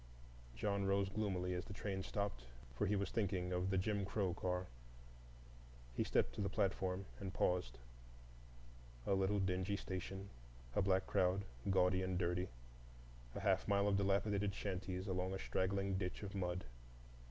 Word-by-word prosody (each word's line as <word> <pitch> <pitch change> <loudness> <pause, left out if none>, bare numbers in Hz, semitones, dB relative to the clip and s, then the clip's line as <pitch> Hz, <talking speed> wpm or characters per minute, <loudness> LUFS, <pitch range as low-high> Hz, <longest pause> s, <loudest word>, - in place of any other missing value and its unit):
John 100 -1 0
rose 100 0 +3
gloomily 95 -3 0
as 90 0 -2
the 100 - -7
train 100 -2 -2
stopped, 100 -11 -2 0.3
for - - +1
he 105 - +2
was 100 -1 0
thinking 95 -5 0
of 90 +1 +1
the 95 - +2
"Jim 100 +2 +1
Crow" 95 -2 0
car; 90 +1 -1 1.3
he - - +1
stepped - - +2
to - - -3
the 100 - +1
platform, 95 -1 0
and 95 -2 -3
paused: 90 -10 +1 1.3
a - - +2
little 95 +1 +3
dingy 95 +1 +1
station, 95 0 -4 0.4
a - - +4
black 95 -1 +3
crowd 95 +2 +2 0.2
gaudy 90 -1 +4
and 95 -1 0
dirty, 90 0 +1 0.9
a - - -3
half - - +2
mile 100 0 +4
of 100 - +4
dilapidated 100 0 +2
shanties 95 -1 -2
along 95 0 0
a - - -1
straggling 95 0 0
ditch 90 +1 -3
of 100 0 -5
mud. 90 -2 -1
95 Hz, 155 wpm, -40 LUFS, 90-100 Hz, 1.3 s, a